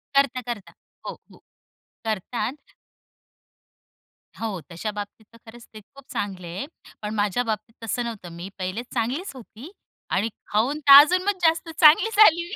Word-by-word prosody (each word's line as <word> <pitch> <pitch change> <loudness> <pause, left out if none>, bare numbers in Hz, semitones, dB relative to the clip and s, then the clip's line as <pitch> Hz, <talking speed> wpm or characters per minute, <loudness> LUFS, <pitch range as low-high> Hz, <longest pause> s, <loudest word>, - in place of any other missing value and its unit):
करता, 270 -2 +2
करता. 205 -5 -8 0.3
हो, - - -4 0.2
हो. - - -17 0.7
करतात. 225 +6 -4 1.7
हो. 215 -5 -3
तशा 210 +6 -4
बाबतीत 205 +1 -8
तर 230 - -17
खरंच 230 +1 -13
ते 215 - -9
खूप 275 +6 -18
चांगले 185 -4 -4
आहे. 200 - -4 0.4
पण 210 +1 -4
माझ्या 205 +3 0
बाबतीत 220 0 -4
तसं 240 +2 -2
नव्हतं. 220 -7 -7
मी 175 +3 -7
पहिले 185 +6 -3
चांगलीच 260 - -2
होती 250 - -12 0.4
आणि 210 +4 0 0.2
खाऊन 250 +9 0
तर 280 -2 +7
अजून 365 +4 +1
मग 405 -1 0
जास्त 330 0 +2
चांगली 320 +9 +7
झाली 345 -5 +6
मी. 400 - -7
230 Hz, 155 wpm, -24 LUFS, 210-290 Hz, 1.7 s, तर